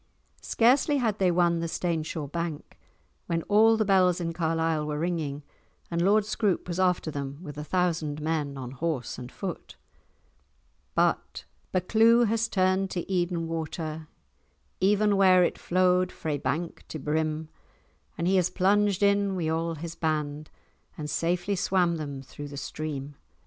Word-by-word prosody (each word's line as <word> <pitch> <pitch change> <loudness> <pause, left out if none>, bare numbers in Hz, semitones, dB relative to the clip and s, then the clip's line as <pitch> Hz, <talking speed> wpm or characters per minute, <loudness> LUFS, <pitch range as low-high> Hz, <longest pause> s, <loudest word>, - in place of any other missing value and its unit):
Scarcely 265 +5 +3
had 220 -5 0
they 190 -2 +3
won 170 -1 +2
the 165 - -2
Staneshaw 160 -2 -2
bank 165 +1 -5 0.5
when 165 -1 -1
all 220 +2 +5
the 215 - +1
bells 185 -3 +4
in 165 -1 -2
Carlisle 165 -2 0
were 150 -1 -2
ringing 155 -4 -2 0.5
and 170 0 0
Lord 205 +3 +4
Scroope 205 -4 0
was 175 0 -3
after 180 -3 +1
them 140 -1 -5
with 145 -4 -8
a 150 - -5
thousand 160 -3 -1
men 150 -3 -2
on 125 -2 -6
horse 135 -3 -3
and 125 0 -8
on - - -21
foot. 190 -3 -6 1.2
But— - - 0 0.3
"Buccleuch 225 +6 +4
has 230 +1 +1
turn'd 190 0 +1
to 175 -2 -4
Eden 175 -2 0
water 160 -1 -4 0.7
Even 205 +1 +3
where 185 -2 +6
it - - -1
flowed 180 0 +2
frae 150 -2 -3
bank 155 +7 -3
to - - -6
brim, 155 +1 -2 0.7
And 170 +1 -1
he 190 +1 +3
has 180 -2 +2
plunged 200 +1 +2
in 200 -1 +3
wi' 165 -3 -1
a' 165 0 -2
his 165 +2 -6
band, 150 -2 -2 0.5
And 150 -1 -4
safely 175 +5 0
swam 180 -2 +1
them 140 -3 -6
through 145 +2 -9
the 140 0 -9
stream. 145 -1 -5
170 Hz, 155 wpm, -27 LUFS, 155-185 Hz, 1.2 s, where